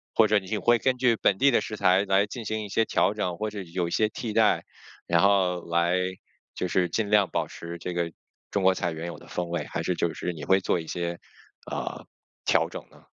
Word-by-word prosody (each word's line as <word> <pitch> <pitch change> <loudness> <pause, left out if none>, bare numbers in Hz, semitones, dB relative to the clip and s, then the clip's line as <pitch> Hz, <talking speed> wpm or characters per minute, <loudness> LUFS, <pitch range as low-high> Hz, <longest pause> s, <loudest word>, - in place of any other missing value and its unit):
或 110 - +6
者 105 -1 +4
你 100 +3 -4
会 120 +3 +4
根 130 +1 +1
据 125 -2 +3
本 100 -3 +2
地 140 +4 +5
的 - - +4
食 110 - -5
材 95 +1 +4
来 95 +1 +3
进 115 +1 -7
行 110 +1 -2
一 105 - -7
些 110 +3 +2
调 105 - +2
整， 90 -5 -2
或 110 0 -2
是 100 -3 -7
有 85 0 -2
一 - - -6
些 110 +4 +2
替 110 0 -5
代， 110 -1 +3 0.4
然 85 0 +3
后， 95 -3 +3
来， 85 +1 +2 0.6
就 90 - -2
是 90 0 +1
尽 110 +2 -1
量 105 -3 +4
保 - - -1
持 85 0 -8
这 90 +1 -4
个 85 -1 -1 0.4
中 100 - 0
国 95 0 +5
菜 85 -1 -2
原 80 +1 -5
有 85 - -6
的 - - -15
风 90 -1 -3
味， 85 -3 -2
还 - - -4
是 - - -1
就 - - 0
是 90 - -3
你 80 - -8
会 95 0 +4
做 90 - 0
一 80 - -8
些， 85 0 -3 0.5
呃， - - -5 0.4
调 - - +3
整 - - -8
呢？ - - -19
95 Hz, 260 characters per minute, -26 LUFS, 85-105 Hz, 0.6 s, 或